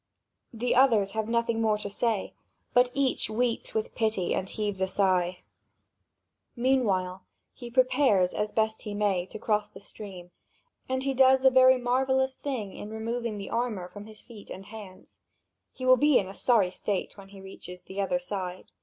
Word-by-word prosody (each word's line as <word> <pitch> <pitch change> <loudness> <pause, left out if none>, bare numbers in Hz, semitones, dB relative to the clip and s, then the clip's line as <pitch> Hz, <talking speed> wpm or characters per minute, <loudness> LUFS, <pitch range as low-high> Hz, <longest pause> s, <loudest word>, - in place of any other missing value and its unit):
The 240 +1 -1
others 225 -7 +4
have 220 +1 -3
nothing 230 -1 0
more 215 -1 +2
to 210 - -5
say; 210 0 -1 0.4
but 245 0 +5
each 275 -5 +1
weeps 235 +1 -1
with 220 - -2
pity 215 -5 0
and 190 - -2
heaves 205 -3 -3
a 190 - +2
sigh. 185 -2 +1 1.1
Meanwhile 205 -8 +1 0.3
he 240 -2 -9
prepares, 255 -7 +3
as 210 0 -2
best 220 0 0
he 210 -1 -6
may, 195 -4 0
to - - -8
cross 210 -1 0
the - - -13
stream, 190 -4 -10 0.6
and 260 0 -1
he 275 0 0
does 265 0 +5
a 265 - +8
very 260 0 +6
marvellous 265 +1 +1
thing 245 -10 -4
in 205 - -8
removing 225 0 -3
the 200 -1 -7
armour 230 -6 -2
from 205 +3 -11
his 215 -1 -11
feet 220 -4 -13
and 195 - -8
hands. 205 -3 -12 0.5
He 255 - -7
will 255 0 +6
be 295 0 +4
in 190 - 0
a 190 - -8
sorry 210 -5 +2
state 195 +1 -3
when 195 -1 -13
he 200 0 -13
reaches 180 -2 -10
the 195 +1 -5
other 200 +7 0
side. 190 -8 -6
215 Hz, 180 wpm, -28 LUFS, 195-250 Hz, 1.1 s, a